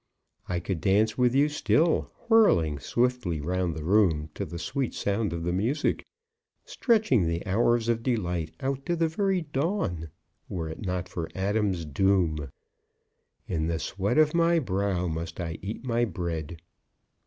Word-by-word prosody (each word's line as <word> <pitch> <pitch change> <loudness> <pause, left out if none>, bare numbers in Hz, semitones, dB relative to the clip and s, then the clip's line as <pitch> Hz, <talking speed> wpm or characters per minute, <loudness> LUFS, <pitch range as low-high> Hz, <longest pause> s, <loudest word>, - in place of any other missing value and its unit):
I 90 -1 0
could 85 -1 -3
dance 105 +2 +3
with 125 0 +2
you 140 +2 +5
still, 155 +2 +2 0.2
whirling 85 - +4
swiftly 120 - 0
round 90 +2 -1
the 80 - -5
room 80 -5 +2
to - - -4
the 85 - -6
sweet 130 +9 -2
sound 100 -1 -1
of 85 0 -4
the 85 +1 -1
music, 120 +11 0 0.6
stretching 215 - +2
the 85 +2 -2
hours 115 +4 +2
of 115 -1 +1
delight 90 -10 -1
out 135 0 -2
to 175 - +1
the 165 -1 +2
very 190 +3 0
dawn, 145 - -2 0.4
were 80 -3 -3
it 80 - -7
not 90 -1 -2
for 80 -3 -5
Adam's 95 -3 0
doom. 80 -2 +1 1.0
In 80 -3 -1
the 85 -1 0
sweat 100 - -1
of 155 -1 +5
my 170 0 +3
brow 95 - 0
must 80 +1 -4
I 80 -2 -4
eat 105 +5 -5
my 120 -2 +1
bread. 85 -6 -4
95 Hz, 155 wpm, -27 LUFS, 85-125 Hz, 1.0 s, you